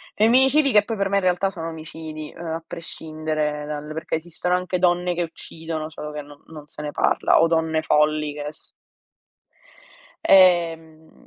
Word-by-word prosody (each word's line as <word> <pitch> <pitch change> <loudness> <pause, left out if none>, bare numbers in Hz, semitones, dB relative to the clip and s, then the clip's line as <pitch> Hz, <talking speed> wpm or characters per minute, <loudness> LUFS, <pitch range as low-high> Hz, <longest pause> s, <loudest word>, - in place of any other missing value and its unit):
Femminicidi 265 +6 +4
che 210 -2 +5
poi 225 +1 -4
per 195 0 0
me 200 - +2
in 200 - 0
realtà 185 +1 +2
sono 165 -4 -6
omicidi, 155 -1 -8
ehm, 170 - -10
a 165 0 -4
prescindere 155 -2 -4
dal 150 0 -6
perché 160 +1 -3
esistono 175 +2 -1
anche 180 0 -2
donne 175 0 +2
che 175 - 0
uccidono, 160 -1 -6
solo 150 -1 -7
che 150 0 -5
no 145 0 -16
non 150 -2 -11
se 150 - -9
ne 150 0 -4
parla - - +2
o 165 - +5
donne 160 -1 +1
folli 150 -1 +2
che 145 0 -6
s 155 - -12 1.5
ehm 165 -4 +3
160 Hz, 170 wpm, -23 LUFS, 155-180 Hz, 1.5 s, che